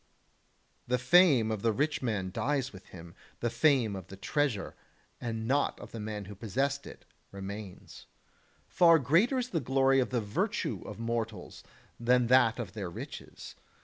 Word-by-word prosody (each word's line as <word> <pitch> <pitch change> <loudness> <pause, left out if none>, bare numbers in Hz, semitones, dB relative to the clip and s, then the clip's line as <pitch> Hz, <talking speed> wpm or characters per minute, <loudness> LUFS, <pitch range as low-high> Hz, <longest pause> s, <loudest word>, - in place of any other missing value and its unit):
The 125 +1 +2
fame 130 -4 +5
of 110 -2 -3
the 115 - +2
rich 145 +7 -1
man 105 -7 -2
dies 135 +2 -1
with 95 -1 -13
him; 85 -1 -12 0.3
the 120 - -1
fame 130 -10 +2
of 95 -2 -8
the 95 - -10
treasure, 135 -1 -1 0.5
and 115 -1 -4
not 140 +3 +1
of - - -11
the 115 - -7
man 105 -1 -5
who 105 - -9
possessed 135 +7 -2
it, - - -12 0.3
remains. 100 0 -9 0.6
Far 170 -2 +6
greater 170 - +3
is 250 -1 -2
the 170 - 0
glory 135 0 +3
of 125 - 0
the 125 - 0
virtue 105 -2 -2
of - - -7
mortals 115 -4 -4 0.4
than 125 +1 +3
that 125 -3 +5
of 110 -7 -5
their 100 -5 -5
riches. 85 - -9
120 Hz, 165 wpm, -30 LUFS, 105-135 Hz, 0.6 s, Far